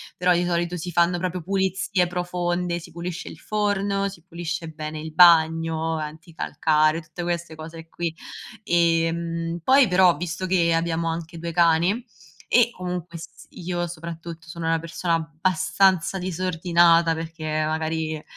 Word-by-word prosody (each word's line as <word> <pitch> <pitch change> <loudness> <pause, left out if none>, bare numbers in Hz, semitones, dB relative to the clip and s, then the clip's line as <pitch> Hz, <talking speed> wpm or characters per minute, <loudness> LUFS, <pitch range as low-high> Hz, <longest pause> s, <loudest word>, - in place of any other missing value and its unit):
però 180 0 +2
di 175 0 +1
solito 175 0 -1
si 175 +2 -5
fanno 175 +1 +2
proprio 180 0 -3
pulizie 190 0 0
profonde, 175 0 -2
si 170 - -10
pulisce 170 +1 -6
il 155 - -11
forno, 200 -1 0
si 180 -4 -12
pulisce 170 -1 -5
bene 155 0 -6
il 160 +1 -7
bagno, 165 -1 +4
anticalcare, 155 0 0
tutte 170 +2 -8
queste 170 -1 -3
cose 165 +1 -10
qui. 170 -1 -3 0.5
Ehm, 165 -1 0
poi 270 0 +5
però 180 -1 +5
visto 170 +3 -4
che 175 -2 +2
abbiamo 165 0 -1
anche 165 0 -5
2 170 +1 -4
cani 170 +7 +2 0.4
e 240 -1 +4
comunque 180 -3 -5
s 165 - -12
io 175 0 -3
soprattutto 165 -1 -8
sono 165 0 -5
una 165 0 +2
persona 165 +1 -1
abbastanza 185 +3 +1
disordinata 170 -2 +3
perché 165 0 -7 0.2
magari 160 0 -2
170 Hz, 140 wpm, -24 LUFS, 165-180 Hz, 0.5 s, poi